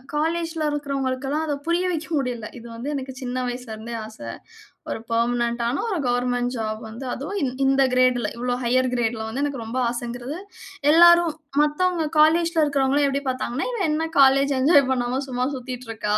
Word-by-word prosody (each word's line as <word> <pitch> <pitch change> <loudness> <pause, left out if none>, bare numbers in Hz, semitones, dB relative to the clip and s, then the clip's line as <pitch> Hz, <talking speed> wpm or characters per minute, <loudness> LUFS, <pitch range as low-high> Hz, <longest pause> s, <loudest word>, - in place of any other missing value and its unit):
காலேஜ்ல 325 +1 -1
இருக்கவங்களுக்கலாம் 275 0 -2
அத 300 - -1
புரிய 345 +2 +1
வைக்க 320 -2 -3
முடியல. 245 -5 -2
இது 235 0 -10
வந்து 240 +5 -5
எனக்கு 265 -1 -5
சின்ன 255 0 -2
வயசுல 245 -2 -5
இருந்தே 230 +2 -7
ஆச. 220 0 -12 0.7
ஒரு - - -3
பெர்மனன்ட் 235 +1 +1
ஆன 250 +4 -1
ஒரு 390 - -1
கவர்ன்மென்ட் 245 0 0
ஜாப் 215 0 -3
வந்து 235 +5 -8
அதுவும் 385 +10 -4
இந் 255 -2 -1
இந்த 270 0 +4
கிரேட்ல 255 -3 +3
இவ்வளோ 245 +1 -1
ஹையர் 255 +2 +2
கிரேட்ல 235 -2 0
வந்து 255 +5 -3
எனக்கு 280 -5 -2
ரொம்ப 235 +3 -3
ஆசங்குறது. 245 +4 -5 0.5
எல்லாரும் 345 0 +7 0.3
மத்தவங்க 325 +3 +1
காலேஜ்ல 330 +2 +4
இருக்கறவர்களும் 280 0 +2
எப்டி 275 +1 -1
பார்த்தாங்கன்னா 255 0 -2
இவ 470 -4 -3
என்ன 310 +2 0 0.2
காலேஜ் 275 +1 +5
என்ஜாய் 280 -2 +5
பண்ணாம 250 +1 0
சும்மா 250 0 -1
சுத்திட்டு 255 -1 -7
இருக்கா. 210 -1 0
260 Hz, 165 wpm, -23 LUFS, 245-295 Hz, 0.7 s, எல்லாரும்